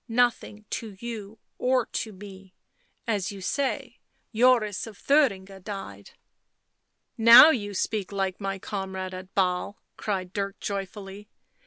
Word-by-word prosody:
" - - -52 0.2
Nothing 215 -3 -7
to 215 -4 -5
you 225 -2 -7 0.2
or 255 -1 +2
to 220 - -4
me.... 190 -1 -12 0.5
As 205 -4 -1
you 200 - -9
say, 270 +8 -2 0.3
Joris 230 -3 +3
of 215 -3 -11
Thuringia 200 -10 +1
died." 185 - -8 1.1
Now 230 +7 +10
you 205 -7 -3
speak 205 +1 -2
like 195 -1 -2
my 195 0 -2
comrade 190 -1 -5
at 185 +1 -9
Basle," 185 +1 0 0.2
cried 185 -3 -3
Dirk 200 0 -3
joyfully. 200 +1 -6
200 Hz, 130 wpm, -26 LUFS, 190-220 Hz, 1.1 s, Now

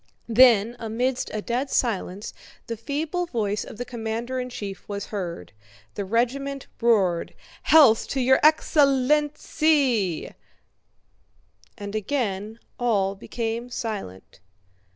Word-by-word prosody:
Then 230 -1 +5
amidst 245 +3 -2
a 215 -1 -4
dead 250 +4 -2
silence 205 -5 -1 0.3
the 230 - -4
feeble 305 - -3
voice 210 -7 -1
of - - -10
the 245 - -4
commander 235 +1 -4
in 250 0 -4
chief 205 -5 -7
was 200 -1 -4
heard. 175 - -5 0.4
The 200 - -3
regiment 265 +6 -1 0.2
roared, 195 -8 +2 0.3
"Health 270 -8 +6
to 270 - -2
your 260 +1 +4
ex... 310 +2 +3
len... 275 -4 +4
len... 300 0 +3
lency!" 275 - 0 1.4
and 205 0 -7
again 215 -2 -2 0.2
all 205 -5 +1
became 230 +3 -4
silent. 210 - -6
235 Hz, 120 wpm, -24 LUFS, 205-265 Hz, 1.4 s, Health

